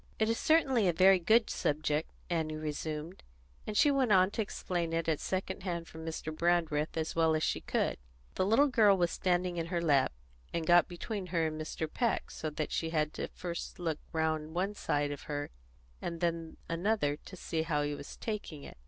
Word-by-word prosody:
"It 220 0 +2
is 230 - 0
certainly 270 - +3
a 175 - +3
very 190 +2 +6
good 220 +6 +3
object," 150 +1 0 0.2
Annie 160 -3 -1
resumed; 155 +2 -4 0.5
and 210 - -2
she 290 - +6
went 265 -5 +2
on 185 0 +5
to 220 - -1
explain 175 -5 -2
it 165 0 0
at 160 -2 +1
second 190 0 -3
hand 170 -3 -3
from 160 0 -9
Mr. 160 -1 -4
Brandreth 165 -2 +1
as 160 0 -2
well 160 -1 +3
as 155 - 0
she - - 0
could. - - 0 0.4
The - - 0
little 225 +9 +5
girl 220 -8 +5
was 175 -2 +2
standing 180 -1 0
in 165 -1 -2
her 170 0 -1
lap, 145 -5 +3 0.4
and 165 -1 -2
got 175 +1 +6
between 185 +2 -5
her 170 -2 +1
and 155 0 -3
Mr. 155 0 -3
Peck, 230 +6 -1
so 155 - -4
that 150 0 -3
she 165 - -1
had 155 -2 0
to - - -6
look - - -5
first 175 0 -5 0.3
around 160 0 -1
one 190 +3 0
side 145 -7 -1
of 145 - -6
her 145 0 -3 0.5
and 170 -1 -4
then 165 -1 -2
another 165 -4 0
to 185 - -12
see 165 -2 -2
how 155 -2 0
he 145 0 -1
was 145 - -8
taking 205 -10 -5
it. - - -11
170 Hz, 205 wpm, -32 LUFS, 155-190 Hz, 0.5 s, very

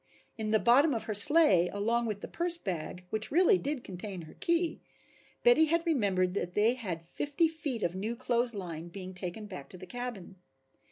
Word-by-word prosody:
In 220 -1 -4
the 220 - +3
bottom 260 +6 +4
of 225 - -3
her 215 - -4
sleigh 205 - +7
along 230 +4 -1
with 210 -2 -4
the - - -6
purse 345 0 +1
bag 180 - -6
which 220 0 -1
really 370 +5 +4
did 285 -3 -4
contain 185 -1 -8
her 155 - -13
key, 340 -1 -1 0.6
Betty 485 -10 +5
had 335 +2 0
remembered 195 - 0
that 180 -2 -4
they 215 +3 +3
had 185 -10 -6
fifty 290 - -1
feet 290 -8 -5
of 170 - -1
new 215 +5 -4
clothes 240 -1 0
line 170 -4 -6
being 185 +1 -9
taken 185 +3 -3
back 185 -9 -9
to 185 - -11
the 185 - -10
cabin. 230 -4 -7
220 Hz, 190 wpm, -30 LUFS, 185-285 Hz, 0.6 s, sleigh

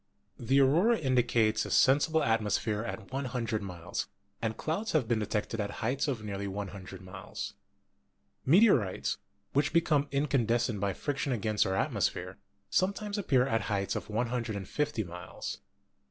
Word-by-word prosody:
The 135 +4 +3
aurora 170 - +5
indicates 120 -5 +2
a - - -5
sensible 150 +4 +4
atmosphere 110 -1 +1
at 110 -2 -6
100 125 -5 -2
miles, 90 -1 -4 0.3
and 110 -1 -2
clouds 195 +8 -2
have 145 -8 +2
been 115 -1 +1
detected 105 +1 -2
at 100 - -2 0.2
heights 130 +5 0
of 125 -6 -2
nearly 100 -1 -4
100 95 -1 -6
miles. 95 0 -7 0.9
Meteorites, 140 - +4 0.3
which 145 +1 +2
become 155 -3 +3
incandescent 120 -6 +1
by 100 0 0
friction 140 +5 -2
against 110 -3 +1
our 95 - 0
atmosphere, 90 0 -1 0.3
some 185 +2 +3
times 210 0 -4
appear 130 -10 +3
at 115 -4 +1
heights 100 -2 0
of - - -4
150 115 +2 -1
miles. 90 -2 -7
115 Hz, 140 wpm, -30 LUFS, 105-140 Hz, 0.9 s, aurora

